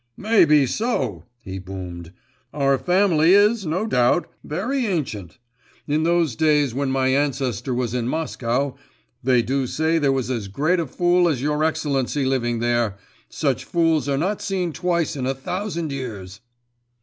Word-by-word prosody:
'May 215 -3 +4
be 150 -2 +4
so,' 130 - -2 0.2
he 95 0 -6
boomed, 90 -3 -8 0.4
'our 140 -2 +2
family 180 -2 +4
is, 205 -1 +3
no 180 +7 -1
doubt, 125 - +2 0.2
very 240 - -2
ancient; 115 - -3 0.5
in 150 +2 +1
those 165 -5 +1
days 150 -3 +2
when 140 +1 -1
my 130 0 +1
ancestor 130 -3 -1
was 120 -2 -1
in 120 -2 -1
Moscow, 135 -3 -1 0.5
they 125 -1 +3
do 135 +1 -1
say 160 +5 +1
there 140 -3 +2
was 130 -2 -1
as 115 -5 -3
great 155 - 0
a 165 - -2
fool 175 +4 +2
as 145 -6 -1
your 150 +1 0
excellency 145 -3 0
living 120 -3 0
there, 120 0 +1
and 100 - -10 0.3
such - - -1
fools 165 -4 +1
are 140 - +1
not 190 +8 -1
seen 185 -4 -2
twice 170 -2 -1
in 130 -2 -3
a 135 - -1
thousand 170 +2 -4
years. 105 -7 -6
140 Hz, 160 wpm, -22 LUFS, 125-170 Hz, 0.5 s, May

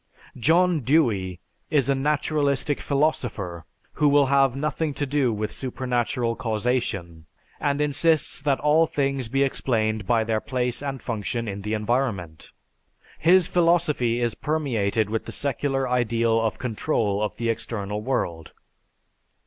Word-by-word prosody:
John 165 +7 +3
Dewey 115 - +1 0.3
is 140 -4 +2
a 140 - +3
naturalistic 145 0 0
philosopher 120 - -1 0.3
who 150 - +2
will 140 0 +5
have 135 -1 +3
nothing 150 +1 -2
to 145 - -1
do 140 -3 +1
with 105 0 -3
supernatural 125 -2 -2
causation 110 -9 -2 0.3
and 145 -1 0
insists 150 +1 +1
that 140 -2 +1
all 155 +2 +4
things 135 -4 -1
be 135 +3 +2
explained 110 -5 0
by 115 -2 +3
their 110 -1 -1
place 125 -2 -2
and 135 -2 -4
function 115 0 -3
in 100 -1 -5
the 105 +2 -2
environment. 105 - -2 0.7
His 175 +2 +5
philosophy 165 -9 +2
is 120 -1 0
permeated 115 -9 0
with 110 - -2
the - - -6
secular 135 -1 -1
ideal 115 -2 +1
of 110 -1 -1
control 110 -4 -1
of 105 -2 -2
the 115 -1 -2
external 105 -2 -3
world. 85 -10 -3
125 Hz, 135 wpm, -24 LUFS, 110-145 Hz, 0.7 s, will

